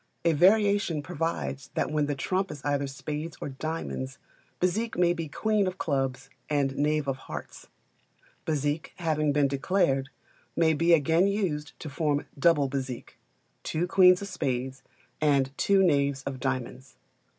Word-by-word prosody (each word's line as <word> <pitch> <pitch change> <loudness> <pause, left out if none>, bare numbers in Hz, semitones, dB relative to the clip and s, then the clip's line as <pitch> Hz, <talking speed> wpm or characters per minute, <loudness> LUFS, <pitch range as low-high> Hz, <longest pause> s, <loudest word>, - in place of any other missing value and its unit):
A 165 - +4
variation 195 -2 +3
provides 165 -4 -3
that - - 0
when 150 -1 +1
the 145 - -1
trump 190 +7 -1
is 145 - -9
either 140 -1 0
spades 150 +4 -5
or - - -4
diamonds, 135 -2 -4 0.4
Bezique 215 +6 0
may 175 -1 +4
be 165 -2 -4
queen 210 +5 +1
of 185 0 -4
clubs 135 -4 -1 0.2
and 140 -2 +1
knave 150 0 +1
of 135 -1 -1
hearts. - - -8 0.8
Bézique 150 0 -1
having 155 -3 0
been 145 -1 +3
declared, 135 -1 +1 0.5
may 160 -1 +3
be 165 +3 +3
again 165 +5 +3
used 175 -8 -2
to - - -6
form 145 0 -1
Double 150 -2 +4
Bezique 130 -2 -5 0.4
two 160 +3 -1
queens 180 +1 +5
of - - -5
spades 130 -4 -3 0.4
and 140 -2 +2
two 195 +4 +3
knaves 140 -5 +2
of 135 -1 -5
diamonds. 130 0 -4
150 Hz, 150 wpm, -27 LUFS, 135-175 Hz, 0.8 s, queens